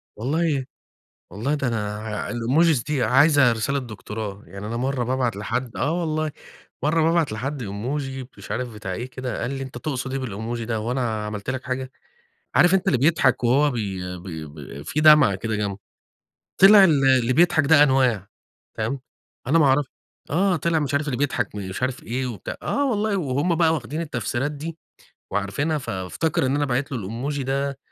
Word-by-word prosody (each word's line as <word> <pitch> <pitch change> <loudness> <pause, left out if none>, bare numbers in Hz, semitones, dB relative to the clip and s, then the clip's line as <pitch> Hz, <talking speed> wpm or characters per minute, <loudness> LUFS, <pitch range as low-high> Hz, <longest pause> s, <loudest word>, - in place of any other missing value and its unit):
والله 145 +3 0 0.6
والله 115 +10 -2
ده 140 -3 -1
أنا 105 -2 -2
ع 110 -1 -4
الemojis 130 +4 +2
دي 145 -4 0
عايزة 135 +1 +5
رسالة 140 +5 0
دكتوراه، 105 -3 -7
يعني 100 +5 -8
أنا 115 +1 -3
مرّة 130 0 -1
بابعت 125 -2 0
لحدّ 120 +4 -3
آه 145 - 0
والله 155 -1 -1 0.5
مرّة 160 +2 +2
بابعت 165 -6 +2
لحدّ 135 +5 -4
emoji 130 +6 -4
مش - - -11
عارف 125 0 -3
بتاع 105 -3 -5
إيه 120 +7 -4
كده 130 -3 -4
قال - - -2
لي 135 -1 -4
"أنت 130 -2 -7
تقصد 130 -2 -3
إيه 135 - -2
بالemoji 115 0 -4
ده، 115 -2 -1
هو 115 +3 -2
أنا 115 -5 -1
عملت 105 +2 -4
لك 130 0 -3
حاجة؟" 130 0 -3 0.7
عارف 175 +2 +6
أنت 190 - +2
اللي 130 - +4
بيضحك 155 -1 +3
وهو 140 +5 +4
بي 95 -5 -4
ب 90 - -12 0.3
ب 70 -2 -9
في 150 - -2
دمعة 150 -10 +7
كده 110 +3 -3
جنبه. 100 -2 -2 0.8
طلع 200 +1 +9
ال 150 -7 +4
اللي 130 -2 +4
بيضحك 165 0 +4
ده 150 0 +7
أنواع. 130 -8 +2 0.5
فاهم، 115 +5 -2 0.5
أنا 165 +5 +4
ما 150 - +5
أعرف 135 +1 +3 0.4
آه 185 +4 +2
طلع 165 +1 +1
مش 140 -1 -2
عارف 145 +1 +1
اللي 125 - -1
بيضحك، 125 -6 -1
مش 100 +2 -5
عارف 130 0 -2
إيه 125 +3 -2
وبتاع 110 -7 -6
آه 285 0 0
والله 215 -3 0
وهُم 150 +1 0
بقى 160 -1 +3
واخدين 150 +3 -3
التفسيرات 130 -1 -2
دي 160 +3 -6 0.5
وعارفينها، 120 +11 -1
فافتكر 130 - -2
إن 135 - +1
أنا 145 - +1
باعت 135 +1 -1
له 130 - -1
الemoji 135 +6 -3
ده، 135 +1 -2
130 Hz, 185 wpm, -23 LUFS, 115-150 Hz, 0.8 s, طلع